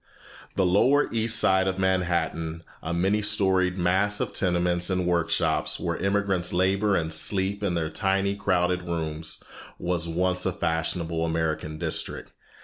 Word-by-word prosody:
The 95 - +2
lower 125 +12 +3
East 115 0 +2
Side 95 -3 +3
of 95 0 -1
Manhattan, 85 -3 -1 0.2
a 80 - -4
many 95 +5 +1
storied 95 -2 +2
mass 95 +4 +1
of - - -2
tenements 90 -1 +1
and 90 -1 0
workshops, 85 -2 0
where 85 -1 -2
immigrants 100 -2 0
labor 95 +3 +2
and 80 -2 0
sleep 95 +5 0
in 95 -4 -1
their 80 -2 -2
tiny 95 +3 0
crowded 90 -2 +1
rooms, 80 -2 -4 0.3
was 85 -1 -1
once 90 +2 0
a 95 - -1
fashionable 80 -1 -1
American 80 -1 -2
district. - - -3
90 Hz, 140 wpm, -26 LUFS, 85-95 Hz, 0.3 s, lower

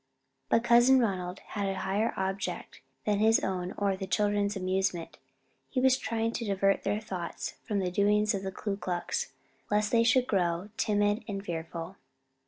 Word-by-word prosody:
But 230 - +3
Cousin 240 +2 +6
Ronald 185 -6 -1
had 200 -2 -1
a 195 - -3
higher 205 +4 0
object 190 +1 -3 0.2
than 205 -1 +1
his 220 +1 +5
own 185 -1 -2
or 200 -1 +1
the 190 0 -5
children's 205 0 +1
amusement: 185 -2 -1 0.5
he 260 - -1
was 260 0 +5
trying 230 -3 -1
to 235 - -3
divert 195 -2 +2
their 210 - 0
thoughts 185 -6 -5
from 210 - -1
the 185 -2 0
doings 210 +2 +3
of 195 - -2
the 190 0 -4
Ku 195 +1 -3
Klux, 200 - -2 0.4
lest 210 0 +1
they 230 -1 +4
should 245 +2 +4
grow 180 -2 0
timid 205 +1 +1
and 200 -2 -4
fearful. 170 +2 -5
200 Hz, 170 wpm, -29 LUFS, 190-220 Hz, 0.5 s, Cousin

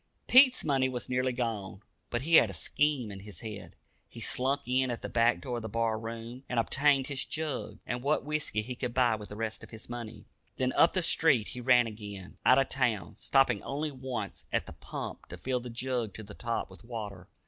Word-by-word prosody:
Pete's 255 0 +7
money 135 -3 +2
was 125 -1 -5
nearly 130 0 +1
gone, 110 -5 -3 0.3
but 120 +1 -2
he 165 +2 +6
had 110 - +6
a - - -6
scheme 135 - 0
in 100 - -7
his 105 +1 -9
head. 105 -3 -7 0.3
He - - -10
slunk 135 +3 0
in 130 +1 +2
at 120 - -4
the - - -3
back 115 0 +3
door 125 -3 -3
of - - -4
the 110 - -5
bar 115 0 0
room, 115 +3 -7
and 125 - +1
obtained 135 +3 +3
his 135 -1 -2
jug, 150 -9 -4
and 125 0 -3
what 140 +1 +1
whiskey 150 -8 -1
he 125 +3 -5
could 125 -1 -4
buy 125 -3 +4
with 105 -1 -5
the 105 - -7
rest 110 0 -3
of - - -11
his 110 0 -10
money. 120 -2 -7 0.3
Then 130 0 +1
up 165 - +5
the 185 - +1
street 140 -10 +3
he 125 - -6
ran 125 -1 +5
again, 105 -4 -8
out 130 - +6
of 135 -1 +3
town, 110 - 0
stopping 135 -1 +2
only 150 +2 -3
once 130 -6 -5
at - - +1
the - - -9
pump - - -7
to - - -8
fill 130 -1 -1
the 125 0 -7
jug 120 -2 -2
to 110 - -7
the 100 0 -10
top 115 +1 -2
with - - -13
water. 105 -6 -6
120 Hz, 225 wpm, -30 LUFS, 110-130 Hz, 0.3 s, Pete's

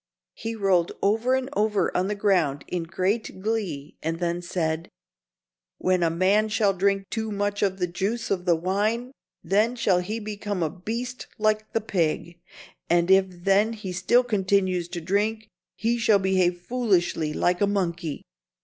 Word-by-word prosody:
He 225 0 -5
rolled 190 -5 +2
over 225 +6 +2
and 260 0 -1
over 210 -3 +1
on 185 +1 +1
the 210 - -1
ground 175 -9 +1
in 175 -2 -3
great 190 +4 -2
glee 190 -9 -3
and 165 +1 -2
then 175 0 -1
said: 165 -1 -2 0.9
"When 185 -1 +1
a 170 - +3
man 195 +6 +2
shall 210 -2 +2
drink 195 +1 +1
too 220 -1 -2
much 205 0 -1
of 190 -2 +1
the 180 - 0
juice 195 +7 -3
of 180 -2 -1
the 175 -2 +4
wine, 210 +8 -1 0.3
then 210 +7 +2
shall 200 -7 +2
he 210 +5 -3
become 205 -3 -3
a 155 - -1
beast 230 +7 -5
like 215 0 0
the 225 - +1
pig, 170 -3 -1 0.5
and 175 +2 +3
if 190 0 +6
then 195 +5 +2
he 210 -4 -6
still 190 +8 +3
continues 190 -5 +1
to 175 -1 -6
drink, 210 +5 0 0.3
he 235 +2 0
shall 220 -3 +5
behave 185 -2 +1
foolishly 180 -9 +1
like 175 +4 +1
a 205 - +4
monkey." 175 -6 -2
195 Hz, 165 wpm, -25 LUFS, 175-215 Hz, 0.9 s, if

